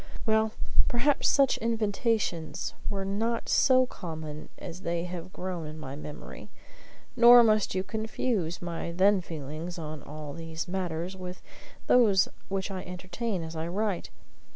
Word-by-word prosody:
Well, 220 -1 +2 0.3
perhaps 270 +4 +2
such 275 -2 +4
invitations 210 - 0 0.2
were 195 -2 -2
not 225 +4 -1
so 255 -1 +5
common 160 -9 -7
as 175 +1 -8
they 170 -1 -1
have 180 0 -6
grown 180 -4 -4
in 155 +1 -8
my 140 -3 -7
memory; 150 +1 -9 0.7
nor 240 0 +9
must 215 -3 +3
you 185 - +1
confuse 210 -4 -2
my 170 -1 -3
then 190 +3 +4
feelings 160 +2 -6
on 155 -2 -6
all 150 0 -7
these 165 +1 -5
matters 180 -1 -3
with 180 -1 -8 0.4
those 210 -6 +5 0.2
which 195 0 -2
I 190 -1 -4
entertain 185 +2 -4
as 160 0 -7
I 160 +1 -2
write. 195 +1 -1
185 Hz, 140 wpm, -29 LUFS, 165-220 Hz, 0.7 s, nor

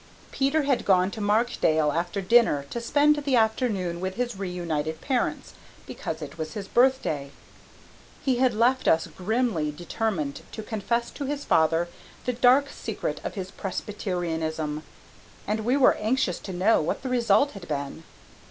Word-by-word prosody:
Peter 280 +3 +1
had 275 -3 +1
gone 185 0 +3
to 220 - -6
Markdale 205 -8 +2
after 175 +5 -2
dinner 195 -8 +4
to 235 - -3
spend 290 +5 +3
the 280 -3 0
afternoon 220 -7 +1
with 190 0 -3
his 240 -2 -2
reunited 170 -5 -3
parents 255 - -2 0.3
because - - -5
it - - -9
was 155 0 -5
his 200 -2 -5
birthday. 240 - +2 1.0
He 260 -3 +2
had 250 -2 +2
left 245 +4 +2
us 160 0 +4
grimly 210 -5 -1
determined 165 -1 -3
to 220 - -6
confess 235 +2 -2
to 285 - -5
his 285 +1 -3
father 165 +2 +3 0.4
the 250 - 0
dark 255 +4 +4
secret - - -4
of - - -5
his 190 -2 -5
Presbyterianism, 165 -6 -3 0.6
and 215 +1 -1
we 245 +5 +1
were 270 - +6
anxious 215 -4 0
to 195 - -7
know 185 +4 +3
what 155 - -2
the 260 - -3
result 240 +2 +3
had 195 -4 -10
been. 140 +1 -4
210 Hz, 155 wpm, -26 LUFS, 170-245 Hz, 1.0 s, were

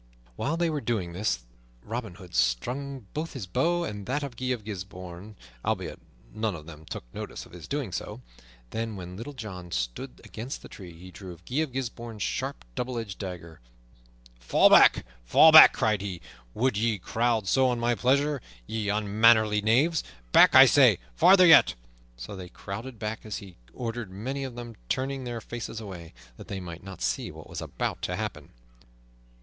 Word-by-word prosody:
While 150 - -1
they 170 -1 +1
were 150 -2 -2
doing 100 -9 -2
this 90 - -1 0.4
Robin 110 -5 -5
Hood 90 -1 -13
strung 125 - -1
both 160 +2 -4
his 125 -8 -5
bow 170 - +1
and 105 -5 -6
that 145 +4 -1
of 135 -4 -6
Guy 130 - -5
of 120 -4 -2
Gisbourne, 95 -1 -8 0.3
albeit - - -2 0.3
none 110 -3 -1
of 75 -2 -10
them 80 -1 -12
took - - -6
notice - - -7
of - - -18
his 85 -3 -10
doing 140 -8 -3
so. 85 - -5 0.5
Then, 115 -1 -3
when 90 -1 -8
Little 115 +9 -7
John 95 -7 -8
stood - - -4
against 120 +5 -7
the - - -9
tree, 90 -4 -11
he 90 +2 -12
drew 90 -1 -10
Guy 130 - -3
of 155 -3 0
Gisbourne's 120 -4 -5
sharp, - - -3
double 125 - -3
edged 110 -4 -5
dagger. 85 -4 -7 0.8
"Fall - - +4
back! - - +7 0.2
fall 155 - +7
back!" 155 0 +11
cried 110 -3 0
he. 95 -3 -5 0.4
"Would 125 -1 +1
ye 110 0 +1
crowd 115 +2 0
so 130 +4 +4
on 120 -1 -1
my 120 +1 +2
pleasure, 140 +3 +1 0.2
ye 105 - -3
unmannerly 105 +1 +4
knaves? 135 +10 +2 0.3
Back, - - +7
I - - +11
say! - - +6 0.2
Farther 185 - +7
yet!" 165 - +7 0.4
So - - -8
they 90 -2 -8
crowded 110 +7 -7
back, 110 +1 -4
as 110 -2 -5
he 95 -3 -11 0.2
ordered, 115 - -5
many 130 +9 -4
of 130 -3 -7
them 120 -2 -8
turning 135 0 -2
their 120 -2 -4
faces 115 -1 -6
away, 90 - -9 0.2
that - - -11
they 95 - -4
might 85 -2 -8
not 95 -1 -8
see - - -1
what - - -11
was - - -6
about - - -3
to - - -2
happen. - - -5
110 Hz, 180 wpm, -27 LUFS, 95-125 Hz, 0.8 s, back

